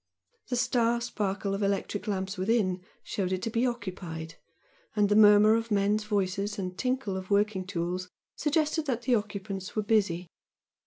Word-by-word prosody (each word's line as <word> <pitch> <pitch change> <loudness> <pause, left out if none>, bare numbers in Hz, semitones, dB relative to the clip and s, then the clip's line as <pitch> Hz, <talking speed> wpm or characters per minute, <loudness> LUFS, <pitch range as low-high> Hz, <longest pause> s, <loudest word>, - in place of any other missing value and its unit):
The 250 - -1
star 240 -1 +2
sparkle 205 -4 -2
of 195 - -2
electric 200 +1 -1
lamps 190 -1 -2
within 190 -2 +1 0.2
showed 190 -2 -2
it 185 0 -2
to 225 - -2
be 235 +3 +2
occupied 180 -8 -5 0.6
and 205 -1 +3
the 205 - +3
murmur 210 0 +7
of 230 0 0
men's 205 +1 +2
voices 200 0 -1
and 185 -2 -4
tinkle 255 -4 -1
of 185 -1 -6
working 200 -2 +1
tools 180 0 -3 0.3
suggested 305 +1 0
that 245 -3 -1
the 250 +1 +2
occupants 200 -3 -3
were 215 - 0
busy. 195 -5 +1
205 Hz, 160 wpm, -29 LUFS, 190-225 Hz, 0.6 s, murmur